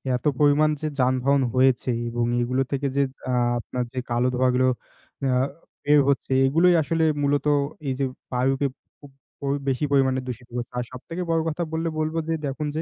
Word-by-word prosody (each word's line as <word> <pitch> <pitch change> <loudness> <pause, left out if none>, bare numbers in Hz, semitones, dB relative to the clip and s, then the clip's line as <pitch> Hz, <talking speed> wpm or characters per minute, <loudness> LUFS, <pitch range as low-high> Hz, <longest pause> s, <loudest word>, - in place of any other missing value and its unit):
এত 125 - -5
পরিমাণ 150 +1 +4
যে 155 - -1
যানবাহন 130 +2 +2
হয়েছে 130 -1 +3 0.2
এবং 120 0 -1 0.2
এগুলো 130 +2 0
থেকে 140 0 0
যে 140 - +3 0.3
আ - - 0 0.3
আপনার 125 +2 -3
যে 130 - -2
কালো 120 +2 +2
ধোঁয়া 130 0 +3
গুলো 130 0 +3 0.6
আ 130 - +2 0.5
বের 150 0 +5
হচ্ছে 135 -1 0
এগুলোই 165 +6 +4
আসলে 160 +2 0 0.2
মূলত 145 +1 +1 0.4
এই 130 - 0
যে 135 - +2 0.3
বায়ুকে 135 +3 +1 0.3
খুব 145 -2 -14 0.3
পুপ 140 -1 -1
প - - -13
বেশি 135 +3 +1
পরিমাণে 130 -2 +3
দূষিত 125 0 -6
করছে। 120 0 -4
আর 125 - 0
সবথেকে 165 +8 -7
বড় 165 -1 +2
কথা 170 +3 -2
বললে 165 +1 -1
বলবো 155 +1 -1
যে 165 - 0
দেখুন 145 +2 -3
যে 160 - 0
135 Hz, 185 wpm, -24 LUFS, 130-150 Hz, 0.6 s, বের